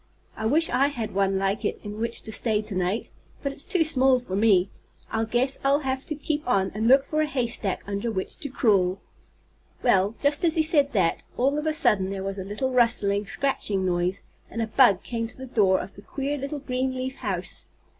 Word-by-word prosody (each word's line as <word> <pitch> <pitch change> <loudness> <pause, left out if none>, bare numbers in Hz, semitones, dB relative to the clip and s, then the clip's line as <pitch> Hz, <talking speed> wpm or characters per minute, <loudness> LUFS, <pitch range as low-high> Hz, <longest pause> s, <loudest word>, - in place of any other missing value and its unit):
I 220 - -2
wish 320 +7 +3
I 275 +2 +3
had 240 -7 -4
one 195 0 +1
like 195 +2 -1
it - - -2
in 210 0 -7
which 230 +1 -2
to 220 - -6
stay 215 -1 +1
to 210 - -6
night. 185 +4 -2 0.3
But 280 - -1
it's 275 - -4
too 360 -3 +2
small 265 -4 +4
for 245 -7 -5
me. 195 -3 +3 0.4
I 225 0 0
guess 245 +4 +1
I'll 280 +2 +3
have 265 -1 -3
to 305 - -3
keep 295 +1 -2
on 195 -5 +1
and 220 +2 -1
look 270 +2 +6
for 310 +2 -1
a 310 - +1
haystack 235 -8 -1
under 200 +4 -3
which 190 -4 -4
to 285 - -6
crawl." 195 -8 +2 0.8
Well, 200 -2 +3
just 285 +4 +1
as 330 -2 +3
he 320 - +3
said 290 -3 +3
that, 185 -6 +1 0.2
all 270 +3 +2
of 305 - -3
a 310 - +1
sudden 195 -10 +2
there 195 -1 -4
was 195 0 -4
a - - -4
little 210 +7 -2
rustling, 210 -4 +2
scratching 205 -9 -1
noise, 180 +1 -1 0.3
and 230 - -6
a 225 - +1
bug 220 -3 +4
came 230 -1 -3
to 235 - -13
the 260 - -7
door 200 -6 +2
of 195 - -7
the 200 - -13
queer 275 +6 -3
little 280 +1 -4
green 260 -1 -2
leaf 260 +1 -4
house. 190 -6 -5
230 Hz, 220 wpm, -25 LUFS, 200-275 Hz, 0.8 s, look